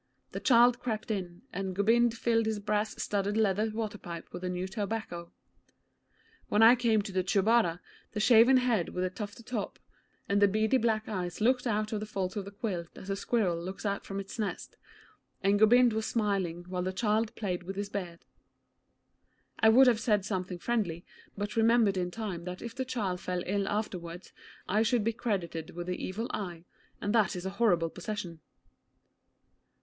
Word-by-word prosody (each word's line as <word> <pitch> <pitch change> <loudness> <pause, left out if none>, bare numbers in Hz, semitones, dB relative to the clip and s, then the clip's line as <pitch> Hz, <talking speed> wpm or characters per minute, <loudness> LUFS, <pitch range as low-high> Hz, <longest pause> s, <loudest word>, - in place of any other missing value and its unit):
The - - -4
child 245 -1 +5
crept 220 -3 -3
in, 180 -4 -4
and 190 0 -3
Gobind 230 +3 +3
filled 230 -1 +1
his 220 -1 0
brass 210 +1 -1
studded 205 +1 -1
leather 215 0 +2
waterpipe 210 -6 -6
with 180 - -6
the 180 - -2
new 180 +1 -3
tobacco. 195 -4 -4 1.2
When 210 +2 +4
I 230 +2 +9
came 230 -4 +2
to 200 - -6
the 185 -1 0
Chubara 195 -2 +2 0.3
the 210 - -2
shaven 235 +4 +6
head 240 -8 +1
with 180 - -3
the 185 - -1
tuft 205 +4 -7
atop, 230 -3 -4 0.5
and 200 0 +2
the 205 - +7
beady 215 +5 +2
black 220 -1 0
eyes 180 -4 -4
looked 250 +3 +2
out 215 -1 -1
of 215 - -1
the 215 - -5
folds 190 -3 -3
of 205 -2 -3
the 200 - -8
quilt 195 -5 -4
as 195 - -6
a - - 0
squirrel 195 -5 0
looks 190 +4 -7
out 200 -1 -1
from 195 - -6
his 195 +3 -6
nest, 210 -2 -4 0.7
and 200 +1 +3
Gobind 240 +2 +6
was 220 0 -1
smiling 195 -6 -1
while 180 0 -3
the 185 +1 -1
child 215 +1 0
played 185 -5 -2
with 190 +2 -6
his 200 0 -3
beard. 180 -5 -6 1.3
I 220 - +6
would 255 +4 +7
have 240 -3 +4
said 210 -4 +1
something 185 -3 -3
friendly, 180 -5 -2 0.3
but 205 +1 -3
remembered 225 -2 +4
in 180 -1 -1
time 185 -4 -5
that 180 0 -6
if 235 - -6
the 260 +2 -3
child 205 -8 -2
fell 180 -1 -2
ill 200 +1 -1
afterwards 180 -5 -4 0.3
I 210 +3 +2
should 225 0 +2
be 230 +2 0
credited 170 -9 -3
with 175 0 -4
the 180 0 -4
Evil 220 +6 -3
Eye, 175 -5 -5 0.4
and 205 - -1
that 215 -6 +3
is 180 0 -5
a 190 - -2
horrible 170 -7 +3
possession. 180 -3 -5
205 Hz, 185 wpm, -30 LUFS, 185-225 Hz, 1.3 s, I